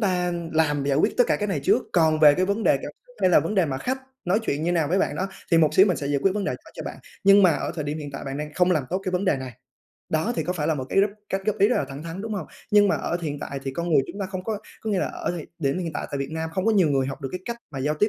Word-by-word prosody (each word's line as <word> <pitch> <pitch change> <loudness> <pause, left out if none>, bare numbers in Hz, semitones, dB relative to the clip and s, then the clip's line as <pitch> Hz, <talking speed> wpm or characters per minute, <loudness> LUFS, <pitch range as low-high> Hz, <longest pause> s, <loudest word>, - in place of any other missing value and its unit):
ta 180 -4 +1 0.2
làm 150 -3 +1
giải 140 -1 +1
quyết - - +2
tất 245 - +5
cả - - +2
cái 210 - -2
này 150 -7 -1
trước. - - +4
Còn 160 -2 +3
về 150 -2 +8
cái 185 - +1
vấn 200 +3 -1
đề - - +5
cảm - - -6
xúc - - -21
hay 185 - +4
là - - +6
vấn 210 - -3
đề 185 -4 +3
mà 135 -2 -3
khách 260 - -3 0.2
nói 180 +4 +2
chuyện 150 -8 -1
như 170 - 0
thế 175 - +2
nào 160 -4 +1
với 185 +4 +2
bạn - - 0
đó 190 - -1 0.2
thì 165 - +5
một 155 -2 +3
xíu 190 +2 +7
mình 180 -6 +1
sẽ 140 - -4
giải 140 0 +1
quyết 195 - +3
vấn 205 - -1
đề - - 0
đó - - -10
cho - - -6
bạn. - - -6 0.3
Nhưng 200 +1 +7
mà 185 - +7
ở - - -3
thời 155 -3 -3
điểm 150 +2 -3
hiện 145 -2 -6
tại 135 - -6
bạn 135 0 -4
đang 150 0 -6
không 180 0 +3
làm 155 -7 +2
tốt 185 - 0
cái 185 - -1
vấn 180 +2 0
đề 170 -7 +2
này." 130 -1 -6 0.6
Đó, 160 +9 +1
thì - - -1
có 180 - -1
phải 155 -5 -2
là 160 - +2
một 130 -3 -4
cái - - +1
góp 200 +1 +2 0.2
cách 195 - -1
góp 215 0 0
ý 200 - +5
rất 250 - +2
là - - +1
thẳng 135 +2 -8
thắn, 170 +4 -6
đúng 225 - -4
hông? 195 - -4 0.2
Nhưng 205 -1 +6
mà - - +2
ở 175 - -2
hiện 145 -2 -3
tại 140 -1 -5
thì 135 - -3
con 170 +4 -3
người 150 - +5
chúng 200 - -8
ta 195 - -1
không 185 -1 -6
có 215 -1 -2 0.2
có 220 - -2
nghĩa 195 - +1
là - - 0
ở - - -3
thời 170 -3 -6
điểm 140 +2 0
hiện 170 -3 -3
tại - - -4
tại 140 - -3
Việt 140 +1 -3
Nam 160 0 -3
không 185 +2 -1
có 225 - +4
nhiều 190 -6 +4
người 135 -2 +2
học 135 - -6
được 135 - -2
cái 185 - -4
cách 235 - -4 0.2
mà 135 - -5
giao 150 +3 0
tiếp 210 - +4
175 Hz, 360 wpm, -24 LUFS, 145-195 Hz, 0.6 s, về